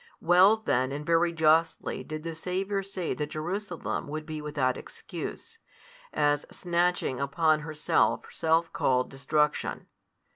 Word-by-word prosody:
Well 185 +6 +6
then 130 - 0
and 145 +2 -5
very 170 +1 +3
justly 160 0 +2
did 155 0 -6
the 165 0 -4
Saviour 190 +4 -2
say 190 -3 -4
that 150 -1 -4
Jerusalem 175 +4 -4
would 155 +1 -5
be 155 -2 -5
without 145 -4 0
excuse, 460 0 -8 0.5
as 145 -1 +2
|172 - - -16
snatching 175 -6 0
upon 155 +3 +2
herself 155 0 +1
self 165 +1 +1
called 125 -1 +1
destruction. 150 +2 0
160 Hz, 135 wpm, -28 LUFS, 150-175 Hz, 0.5 s, Well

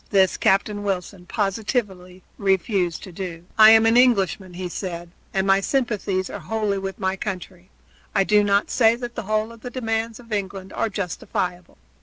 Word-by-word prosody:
This 190 -3 +3
Captain 205 +2 +1
Wilson 190 -2 -4
positively 195 -3 -2 0.2
refused 190 -3 0
to 185 - -9
do. 175 -2 -7
"I 215 0 +9
am 220 0 +7
an 225 +1 +4
Englishman," 195 -7 +3
he 180 0 -4
said, 175 -1 -6 0.2
"and 190 0 0
my 195 0 +4
sympathies 205 -7 -1
are - - -7
wholly 215 -3 -1
with 195 0 -5
my 190 -2 -1
country. 185 -2 -6 0.5
I 195 - +4
do 210 +1 +4
not 200 0 +2
say 225 -2 +4
that 240 0 -6
the 235 - -4
whole 215 +1 0
of 230 -1 -14
the 245 - -6
demands 225 -2 -2
of 230 -2 -9
England 195 -1 -4
are 225 - -1
justifiable. 180 -2 -4
195 Hz, 175 wpm, -23 LUFS, 185-220 Hz, 0.5 s, I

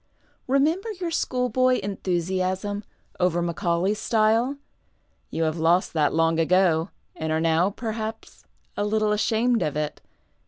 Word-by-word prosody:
Remember 315 - +1
your 355 -3 -4
schoolboy 255 -3 +1
enthusiasm 190 +1 -2 0.4
over 180 -1 +2
Macaulay's 175 +3 0
style. 230 +4 +2 0.7
You 165 - -2
have 160 +1 -1
lost 170 +3 +2
that 155 -3 +2
long 165 0 +2
ago, 170 0 +3 0.3
and 160 0 -3
are 160 - +1
now, 165 +3 +2
perhaps, 220 +1 -6 0.3
a - - -1
little 215 0 +1
ashamed 225 +3 +1
of 150 -1 -1
it. 150 -1 -3
195 Hz, 125 wpm, -25 LUFS, 165-225 Hz, 0.7 s, ago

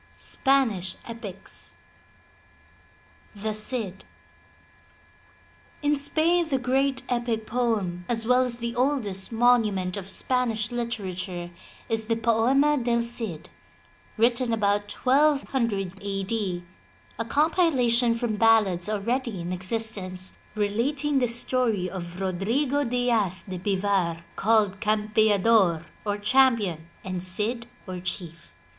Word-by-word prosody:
^SPANISH 245 -10 0
EPICS 190 - -9 1.6
THE 215 +1 -3
CID 215 -3 -3 1.8
In 295 0 +3
Spain 320 +4 +2
the 270 - +2
great 260 +1 0
epic 240 -3 -1
poem 220 -8 -1
as 225 -2 +2
well 250 +2 +4
as 250 -2 +2
the 235 0 -4
oldest 240 -8 0
monument 220 -6 +2
of 195 -1 -6
Spanish 225 -1 0
literature 190 -7 -4 0.4
is 225 -1 -1
the 230 +1 0
Poema 245 +6 +3
del 235 -1 +1
Cidy 225 -9 -4 0.7
written 235 +2 +2
about 205 -1 +1
1200 260 -8 +1
A. 195 -1 -3
D., 190 -4 -2 0.6
a - - +1
compilation 255 -6 +2
from 230 -2 -2
ballads 210 -5 +3
already 230 +1 -1
in 175 +1 -4
existence, 185 -1 -2 0.2
relating 265 +8 0
the 250 - +2
story 235 -4 0
of 175 -1 -7
Rodrigo 230 +10 0
Diaz 230 -7 0
de 185 -3 -6
Bivar, 190 -3 0
called 205 -3 +2
Campeador 210 -4 +3 0.2
or 205 -1 -1
Champion 210 -8 +2 0.2
and 185 -1 -4
Cid 215 +6 -2 0.2
or 185 -1 -5
Chief. 175 -2 -6
220 Hz, 110 wpm, -26 LUFS, 190-245 Hz, 1.8 s, well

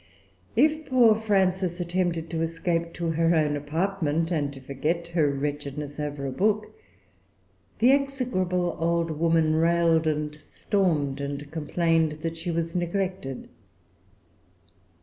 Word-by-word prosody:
If 310 0 +3
poor 245 -4 +6
Frances 190 -4 +1
attempted 175 -2 -1
to 165 -1 -2
escape 165 +1 -1
to 170 -2 -2
her 165 +1 +2
own 150 -2 +2
apartment, 165 +2 -1
and 145 -4 0
to 140 - -10
forget 150 +6 -2
her 165 -4 +2
wretchedness 145 +1 -4
over 145 -2 -3
a 135 - -2
book, 210 +7 0 1.0
the 245 +3 +5
execrable 240 -11 0
old 170 0 +1
woman 160 0 +2
railed 165 0 +3
and 150 -1 -1
stormed, 150 -3 -1
and 140 +1 -5
complained 160 0 +1
that 165 0 -2
she 165 +2 -5
was 165 0 -2
neglected. 180 -6 -3
165 Hz, 125 wpm, -26 LUFS, 150-180 Hz, 1.0 s, poor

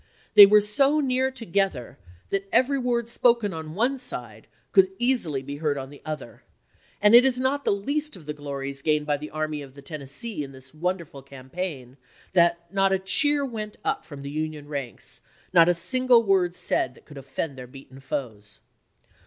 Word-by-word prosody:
They 205 -1 +11
were 210 +1 +6
so 275 +9 +3
near 260 -2 +1
together 195 - -2 0.3
that 195 0 -1
every 275 +2 +3
word 240 -2 -1
spoken 235 -4 +2
on 160 0 -7
one 255 +6 +1
side 115 - -4 0.2
could 190 -1 +5
easily 195 - +1
be 140 +1 -6
heard 150 -2 -1
on 135 0 -6
the 145 - -14
other, 155 -2 -7 0.6
and 210 +1 +4
it 240 +1 +9
is 260 -1 +2
not 275 +2 0
the - - +3
least 285 +9 -1
of 170 -5 -14
the 150 - -4
glories 140 -1 -5
gained 150 0 +1
by 145 -1 0
the 150 +1 -8
Army 155 -1 -3
of 135 -1 -12
the 140 - -12
Tennessee 150 - -5
in 135 -1 -9
this 130 0 -15
wonderful 170 -3 -4
campaign 135 0 -7 0.3
that 170 -1 +2
not 195 0 +3
a 190 - +3
cheer 285 +9 +2
went 215 -4 -6
up 270 - -1
from 140 -2 -10
the 140 - -6
Union 155 -1 -4
ranks, 140 -5 -5 0.3
not 170 -1 +6
a - - +5
single 240 +7 +3
word 185 -4 +2
that 130 -6 -2
could 145 -2 -11
offend 135 +2 -5
their 125 -1 -9
beaten 135 0 -14
foes. 110 -6 -6
170 Hz, 185 wpm, -25 LUFS, 140-230 Hz, 0.6 s, They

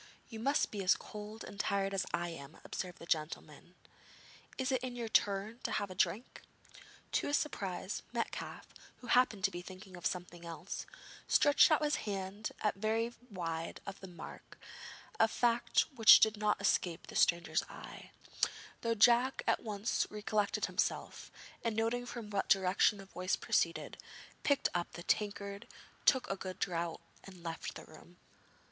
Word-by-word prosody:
'You 225 - -7
must 280 +6 +2
be 205 -2 -3
as 185 +2 +5
cold 210 +1 -8
and 200 - -10
tired 195 -1 0
as 190 -1 0
I 175 0 -1
am,' 150 -2 -9
observed 180 -2 -5
the - - -10
gentleman; 155 -2 -3 0.8
'it 260 0 0
is 255 -1 +1
your 240 -2 -4
turn 210 +2 +1
to - - -2
have 200 -2 -1
a - - -5
drink.' 185 +6 -1 0.7
To - - +1
his 290 - +3
surprise, 195 - -3
Metcalfe, - - -4 0.2
who - - -14
happened 240 -5 +3
to 195 - +3
be 175 - -5
thinking 185 +1 -11
of 175 - -1
something 175 -1 -5
else, 170 +2 -6 0.4
stretched 290 0 +6
out 310 -1 +3
his 300 0 +2
hand 200 0 -4
at 210 - +2
first 195 - -19
very 225 +2 +1 0.2
wide 165 -4 -4
of 195 0 -7
the 190 - -9
mark, 175 -1 -10 0.6
a - - +6
fact 235 +1 +2
which 225 -3 +10
did 220 0 +4
not 210 0 +1
escape 180 -4 +1
the - - -11
stranger's 170 0 +3
eye, - - -10 0.7
though 230 -1 +1
Jack 240 +4 +5
at - - +2
once 210 -1 -1
recollected 210 -1 0
himself, - - -2 0.3
and, 230 -2 0
noting 235 +2 0
from 230 -4 -7
what 195 -1 -1
direction 195 +2 +4
the 195 - -10
voice 185 0 -1
proceeded, - - 0 0.4
picked 285 -1 +3
up 175 -1 -2
the 175 - -7
tankard, 200 0 -1 0.4
took 260 -2 +5
a 195 - -1
good 185 -1 -6
draught 170 -2 -2 0.2
and 185 -3 -12
left 165 -1 -5
the - - -9
room. 175 +3 -16
200 Hz, 165 wpm, -34 LUFS, 180-225 Hz, 0.8 s, which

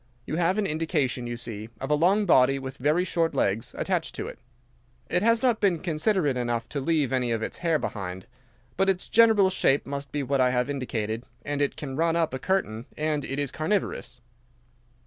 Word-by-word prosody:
You 155 - -3
have 175 +3 +2
an 210 - +1
indication, 150 -7 -1
you 120 0 -4
see, 110 -2 -7
of 135 +3 -4
a - - +5
long 185 +7 +3
body 135 -5 +5
with 135 0 -7
very 150 +7 +2
short 165 -3 0
legs 115 -1 0
attached - - -1
to - - -3
it. - - -8 0.7
It 180 - +2
has 230 +3 +3
not 240 -3 +2
been 195 -5 +3
considerate 160 -3 0
enough 120 -2 -1
to 145 - -3
leave 145 -2 +1
any 125 -2 +1
of 115 -1 -1
its - - -5
hair 165 -3 +2
behind 95 -8 -5
it. 120 - -29 0.5
But 195 +1 +3
its 185 -1 0
general 220 -4 +5
shape 140 -6 +2
must 140 0 -5
be 145 -1 -2
what 135 0 +1
I 125 - +4
have 125 +2 0
indicated, 115 -4 -3 0.2
and 145 0 -2
it 140 - 0
can 140 -4 -6
run 165 +1 +2
up 165 -5 +1
a 130 - -3
curtain, 150 - -1
and 150 -1 -1
it 135 - -4
is 145 -2 -1
carnivorous." 155 - -2
145 Hz, 205 wpm, -26 LUFS, 125-170 Hz, 0.7 s, a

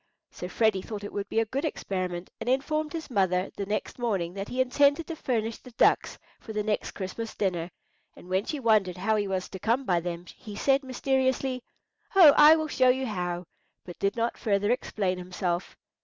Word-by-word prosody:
So 180 - -7
Freddy 215 -2 +2
thought 205 +1 -7
it 205 - -7
would 200 0 -4
be 225 - +1
a 225 - +2
good 265 +6 -3
experiment, 185 - -3
and - - -3
informed 305 +4 0
his 320 -4 -6
mother 185 -3 +1
the 200 - -4
next 210 +4 -3
morning 195 -8 -1
that 195 +1 -5
he 250 - -5
intended 280 +5 +3
to 330 - -5
furnish 230 -6 -2
the - - -13
ducks - - +3 0.2
for 220 - -9
the 210 0 -1
next 210 0 -1
Christmas 215 +4 -5
dinner 175 -4 -1 0.5
and - - -14
when 190 +3 0
she 300 - -3
wondered 215 -7 +2
how 215 +4 +1
he 205 -1 0
was 190 -1 -2
to 190 - -8
come 235 +7 +1
by 175 -5 +2
them, 175 0 -5
he 210 -2 -10
said 275 +5 +2
mysteriously, 260 0 0 0.5
"Oh, 330 -7 +9
I 300 +1 +9
will 315 -1 -1
show 255 -3 +3
you 260 +1 +2
how," 180 -5 -3 0.4
but 175 - -10
did 200 +1 0
not 235 0 -1
further 205 0 +1
explain 195 -7 -1
himself. 180 0 -3
215 Hz, 200 wpm, -27 LUFS, 185-260 Hz, 0.5 s, Oh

